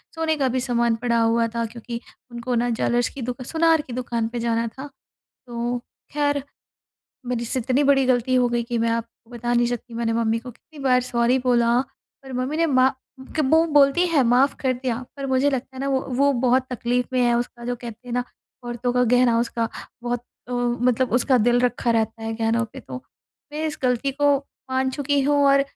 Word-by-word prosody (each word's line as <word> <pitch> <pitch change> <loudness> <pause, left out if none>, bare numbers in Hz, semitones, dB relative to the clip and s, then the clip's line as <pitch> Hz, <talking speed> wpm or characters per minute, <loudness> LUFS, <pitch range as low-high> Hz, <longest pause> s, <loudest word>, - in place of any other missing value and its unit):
सोने 320 -1 0
का 270 - +1
भी 255 +1 0
सामान 235 -2 +1
पड़ा 235 -1 +1
हुआ 230 0 +2
था 230 0 0
क्योंकि 235 +1 -7 0.3
उनको 240 +1 -3
न 240 +1 +1
ज्वेलर्स 240 +1 +1
कि 275 - -9
दुक 250 +1 -4
सुनार 325 0 +3
की 255 - -10
दुकान 235 -2 -2
पे 240 +1 -5
जाना 230 0 0
था। 265 +5 -8 0.6
तो 240 0 -2 0.4
ख़ैर 290 -1 +1 0.9
मेरे 240 -1 -2
से 255 +3 -2
इतनी 260 +4 +1
बड़ी 270 -2 +4
गलती 255 0 +2
हो 250 -1 +4
गई 240 0 0
कि 235 0 -3
मैं 230 0 +1
आपको 230 0 -5
बता 240 0 -3
नहीं 240 0 +3
सकती 240 -1 -5
मैंने 230 -1 -1
मम्मी 230 0 +1
को 250 +2 -9
कितनी 295 +6 -18
बार 250 -1 +4
सॉरी 245 +1 +1
बोला 240 -1 +3 0.4
पर 265 -1 -10
मम्मी 255 +4 -2
ने 330 +1 +2
मा 260 -2 +4 0.5
क 265 -4 +2
वो 320 +1 +5
बोलती 290 +3 +4
हैं 320 -6 +3
माफ़ 250 +4 +3
कर 260 -2 +1
दिया 250 -1 -2 0.2
पर 275 0 -4
मुझे 265 +2 +2
लगता 265 0 -4
है - - -6
ना, 275 - -1
वो 265 -1 +1
वो 280 +3 +3
बहुत 255 +1 +3
तक़लीफ़ 245 0 -1
में 255 - +2
है। 240 0 +3
उसका 240 0 -5
जो 245 +1 -1
कहते 235 0 -10
हैं - - -5
ना 245 - +1 0.4
औरतों 240 0 -2
का 250 0 +2
गहना 245 -1 +4
उसका 230 -1 -1 0.3
बहुत 245 0 -2 0.3
अ, - - -5
मतलब 245 +1 +1
उसका 255 0 +3
दिल 240 +2 +3
रखा 245 -1 +1
रहता 225 0 0
है 225 0 -3
गहनों 230 +1 +1
पे। - - -9
तो 130 - -8 0.6
मैं 305 +1 -3
इस 305 - -4
गलती 250 +2 +1
को 290 - +5 0.4
मान 260 0 +1
चुकी 285 +1 0
हूँ 290 +1 +2
और 275 0 +5
245 Hz, 210 wpm, -23 LUFS, 235-265 Hz, 0.9 s, वो